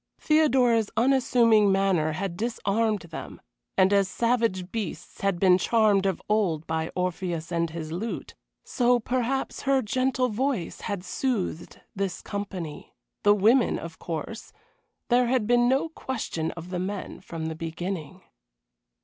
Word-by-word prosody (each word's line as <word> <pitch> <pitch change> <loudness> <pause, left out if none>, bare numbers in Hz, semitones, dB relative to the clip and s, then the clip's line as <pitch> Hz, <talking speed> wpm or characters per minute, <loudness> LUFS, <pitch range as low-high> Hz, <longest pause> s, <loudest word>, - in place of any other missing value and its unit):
Theodora's 255 -8 +3
unassuming 235 -4 +4
manner 190 -5 +2
had 185 +1 -3
disarmed 220 0 0
them, 170 -1 -8 0.4
and 190 +1 +5
as 200 -1 +4
savage 225 -4 0
beasts 215 -7 -5
had 195 -3 0
been 185 -1 +5
charmed 205 -2 +3
of 190 - -1
old 185 -7 +1
by 160 0 -2
Orpheus 180 -2 -2
and 170 -1 0
his 160 -1 -6
lute, 190 +4 -4 0.3
so 245 0 +2
perhaps 255 +3 -2
her 270 -1 +2
gentle 255 +3 +1
voice 235 -4 -2
had 200 -3 -4
soothed 205 - -3
this 195 -2 -3
company 190 -6 -6 0.3
the 205 0 +5
women, 225 +5 +4
of 165 -1 -8
course; 175 +7 -6 0.6
there 245 0 +4
had 250 -3 +1
been 240 +1 +4
no 270 +5 +2
question 230 - -4
of 170 +1 -9
the 180 - -2
men 190 +1 -4
from 165 -3 -6
the 160 - -2
beginning. 170 +2 -5
200 Hz, 140 wpm, -26 LUFS, 175-240 Hz, 0.6 s, and